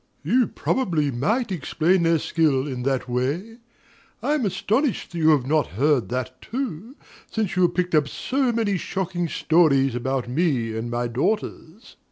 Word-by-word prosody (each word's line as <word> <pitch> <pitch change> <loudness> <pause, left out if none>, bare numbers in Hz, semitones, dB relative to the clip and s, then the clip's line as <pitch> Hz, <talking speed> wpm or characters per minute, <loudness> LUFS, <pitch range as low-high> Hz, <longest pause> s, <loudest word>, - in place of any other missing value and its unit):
You 235 - +3
probably 165 - 0
might 215 - 0
explain 175 +1 +1
their 165 0 +3
skill 150 -4 +1
in 130 -3 -4
that 130 0 -1
way. 145 - -2 0.7
I 295 - +1
am 275 -8 +1
astonished 220 - -1
that 170 - -5
you 160 0 +4
have 145 -5 +4
not 150 0 +1
heard 140 -1 +2
that 130 +1 -4
too, 235 - -5 0.3
since 215 -5 -2
you 185 - +2
have 175 - +3
picked 180 -1 -1
up 150 -2 +3
so 260 - -1
many 220 -4 0
shocking 180 -1 -3
stories 145 -7 +3
about 130 +1 -2
me 125 -5 0
and 115 +1 -3
my 120 0 -1
daughters. 140 - 0
MRS. 190 +9 -19
S. - - -16
160 Hz, 175 wpm, -23 LUFS, 135-200 Hz, 0.7 s, you